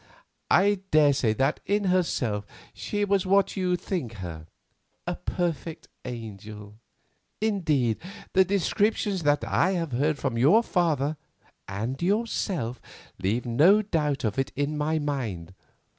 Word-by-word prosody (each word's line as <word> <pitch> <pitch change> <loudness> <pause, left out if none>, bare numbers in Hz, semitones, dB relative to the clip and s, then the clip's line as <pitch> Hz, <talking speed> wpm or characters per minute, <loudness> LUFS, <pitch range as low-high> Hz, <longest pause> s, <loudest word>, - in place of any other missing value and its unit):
I 205 0 +4
daresay 140 -7 +4
that 135 +5 +1
in 205 +2 0
herself 135 - 0 0.3
she 205 0 -2
was 200 -1 +1
what 195 +1 +3
you 180 -2 +1
think 170 - -4
her, 85 -6 -7 0.6
a - - -2
perfect 165 -2 -3 0.2
angel; 105 -3 -8 0.6
indeed, 155 - +1 0.3
the 190 - +6
descriptions 200 +1 0
that 145 -1 +2
I 185 +3 +2
have 165 -5 -2
heard 145 +5 +1
from 115 -4 -2
your 190 - +5
father 155 - 0 0.5
and 110 +9 -4
yourself 185 - -1 0.4
leave 105 +6 -1
no 165 - +5
doubt 150 -8 -1
of 110 +2 -1
it 135 - -1
in 145 +2 -1
my 150 +2 0
mind. 115 - -3
150 Hz, 130 wpm, -26 LUFS, 115-185 Hz, 0.6 s, the